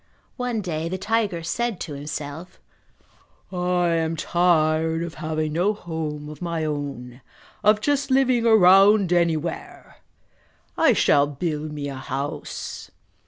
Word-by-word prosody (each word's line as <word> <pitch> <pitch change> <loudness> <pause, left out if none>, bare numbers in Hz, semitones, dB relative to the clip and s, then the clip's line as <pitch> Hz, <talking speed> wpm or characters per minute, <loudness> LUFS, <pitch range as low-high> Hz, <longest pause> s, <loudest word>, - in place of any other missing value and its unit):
One 245 -3 -2
day 165 -3 -3
the 185 - -3
tiger 205 -3 -1
said 225 +4 -2
to 150 - -5
himself, 150 +4 -7 0.9
"I 180 -1 0
am 165 -1 0
tired 160 -1 +1
of 170 -1 -6
having 155 -1 -3
no 180 +6 +2
home 155 -5 -5
of 150 -1 -10
my 170 -2 -2
own, 140 -4 -5 0.4
of 210 +1 +4
just 285 +3 0
living 260 -3 +3
around 195 -2 +6
anywhere! 170 -1 -2 0.8
I - - +4
shall 145 0 +3
build 150 0 -4
me 145 -1 -5
a 140 - -5
house." 140 +3 -5
165 Hz, 125 wpm, -23 LUFS, 150-190 Hz, 0.9 s, around